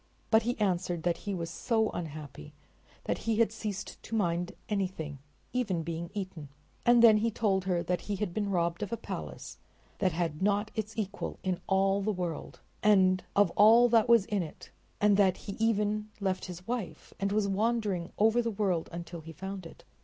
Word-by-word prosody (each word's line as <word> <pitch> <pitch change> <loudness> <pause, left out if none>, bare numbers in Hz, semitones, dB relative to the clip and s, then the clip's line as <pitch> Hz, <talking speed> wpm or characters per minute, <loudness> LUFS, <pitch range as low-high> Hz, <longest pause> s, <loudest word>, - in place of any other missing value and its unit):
But 220 0 +6
he 240 +2 -2
answered 180 -5 0
that 175 -1 +1
he 200 - -1
was 170 -2 -4
so 220 -3 0
unhappy 150 - -7 0.5
that - - -2
he 225 - +3
had 220 -1 +3
ceased 210 -3 -5
to 230 - -5
mind 175 -4 0
anything, 185 -8 -3 0.3
even 205 -10 0
being 165 +1 -4
eaten, 185 -7 -5 0.4
and 240 -1 +6
then 220 -2 +8
he 225 +2 +1
told 195 -4 0
her 175 -2 +1
that 180 0 -1
he 205 - -3
had 195 -2 -3
been 205 0 -1
robbed 170 -2 0
of 205 - -3
a 230 - -1
palace - - -7 0.4
that 185 -2 +2
had 165 -1 -2
not 205 +2 +1
its 220 0 -4
equal 205 -2 -3
in 185 -2 -1
all 195 +1 +2
the 215 +2 0
world, 180 -4 -5 0.2
and 185 -3 +4
of 200 -4 +4
all 225 +5 +7
that 230 -1 +4
was 230 -4 +6
in 210 -3 0
it, 160 -3 -9 0.3
and 205 -1 +4
that 190 -2 +4
he - - -7
had 215 - -9
even 215 -1 +1
left 190 -2 -1
his 180 0 -8
wife 235 -5 -4
and 195 0 0
was 210 -1 +2
wandering 205 -3 0
over 225 +3 +4
the 230 - -1
world 195 -6 -1
until 170 0 -7
he 165 +1 -9
found 190 +1 -6
it. - - -16
195 Hz, 195 wpm, -30 LUFS, 175-215 Hz, 0.5 s, then